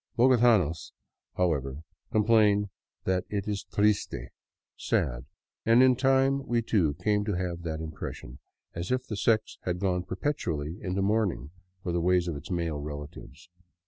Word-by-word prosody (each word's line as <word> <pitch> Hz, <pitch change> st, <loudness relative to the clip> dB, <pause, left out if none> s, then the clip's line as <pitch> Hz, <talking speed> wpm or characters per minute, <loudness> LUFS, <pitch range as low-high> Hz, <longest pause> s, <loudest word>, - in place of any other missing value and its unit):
Bogotanos, 115 Hz, -, +3 dB, 0.4 s
however, 75 Hz, -5 st, -1 dB, 0.3 s
com 110 Hz, -, +3 dB
plain 105 Hz, -2 st, +4 dB, 0.3 s
that 95 Hz, -1 st, 0 dB
it 100 Hz, -1 st, -3 dB
is 105 Hz, -1 st, -2 dB
triste 105 Hz, +3 st, +1 dB, 0.4 s
— -, -, -66 dB
sad, -, -, 0 dB, 0.4 s
and 115 Hz, +3 st, +6 dB
in 130 Hz, -1 st, +5 dB
time 135 Hz, +1 st, +2 dB
we 120 Hz, -1 st, +1 dB
too 85 Hz, -10 st, +1 dB
came 105 Hz, +4 st, +1 dB
to 105 Hz, 0 st, -1 dB
have 90 Hz, -2 st, -3 dB
that 80 Hz, -2 st, -4 dB
im 80 Hz, -1 st, -5 dB
pression, 65 Hz, -3 st, -8 dB, 0.3 s
as 85 Hz, +5 st, -4 dB
if 130 Hz, 0 st, 0 dB
the 110 Hz, -, -5 dB
sex 110 Hz, +2 st, +1 dB
had 90 Hz, -1 st, -2 dB
gone 90 Hz, -1 st, 0 dB
perpetually 90 Hz, -, -3 dB
into 95 Hz, 0 st, -1 dB
mourning 100 Hz, -, 0 dB, 0.3 s
for 90 Hz, -, -2 dB
the 85 Hz, 0 st, 0 dB
ways 90 Hz, 0 st, +2 dB
of 85 Hz, -, -2 dB
its 70 Hz, -, -9 dB
male 85 Hz, -4 st, -2 dB
relatives. 75 Hz, -2 st, -8 dB
95 Hz, 160 wpm, -28 LUFS, 80-110 Hz, 0.4 s, and